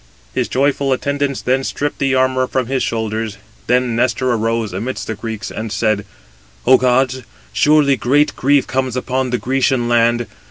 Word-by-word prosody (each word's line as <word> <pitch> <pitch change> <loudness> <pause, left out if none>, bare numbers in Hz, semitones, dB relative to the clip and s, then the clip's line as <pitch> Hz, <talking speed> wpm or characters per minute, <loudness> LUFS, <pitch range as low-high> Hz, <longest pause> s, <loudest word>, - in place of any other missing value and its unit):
His - - 0
joyful 140 0 +1
attendants 140 +1 -2
then 130 +2 +1
stripped 145 +2 -3
the 135 -1 +1
armour 130 0 +2
from 130 -1 -1
his 130 +1 -1
shoulders. 110 -1 -2 0.3
Then 125 -1 +2
Nestor 125 +1 +1
arose 115 -3 -1
amidst 115 +8 -4
the 110 - -3
Greeks, 110 0 -6
and 110 0 -5
said: 105 0 0 0.6
"O 130 +1 +7
gods, 130 +1 +1 0.3
surely 150 -2 +4
great 145 +4 +2
grief 140 +1 +2
comes 130 -1 -2
upon 130 0 -1
the 125 - 0
Grecian 130 -1 0
land. 120 0 +2
125 Hz, 160 wpm, -18 LUFS, 115-135 Hz, 0.6 s, O